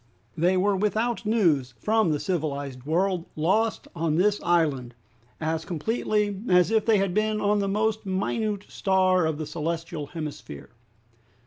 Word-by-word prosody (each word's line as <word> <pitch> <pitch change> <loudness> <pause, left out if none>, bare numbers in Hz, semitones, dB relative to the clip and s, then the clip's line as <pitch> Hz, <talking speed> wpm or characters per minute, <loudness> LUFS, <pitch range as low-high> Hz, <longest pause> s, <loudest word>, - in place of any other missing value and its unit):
They 180 +3 +2
were 200 +2 +2
without 215 +3 -1
news 155 - +2
from 220 - +2
the 150 -2 0
civilized 140 -7 -3
world, 180 +2 0
lost 200 +8 0
on 165 -2 0
this 205 +4 +2
island, 145 -8 +1 0.4
as 160 0 -2
completely 205 +3 -1
as 180 +2 +4
if 220 0 +2
they 220 -2 +5
had 195 -2 0
been 215 +1 +1
on 205 0 +2
the 200 - 0
most 215 +2 0
minute 205 +2 -2
star 185 -3 +2
of 160 -2 -2
the 155 - -4
celestial 165 0 -4
hemisphere! 150 - -8
185 Hz, 145 wpm, -26 LUFS, 160-210 Hz, 0.4 s, they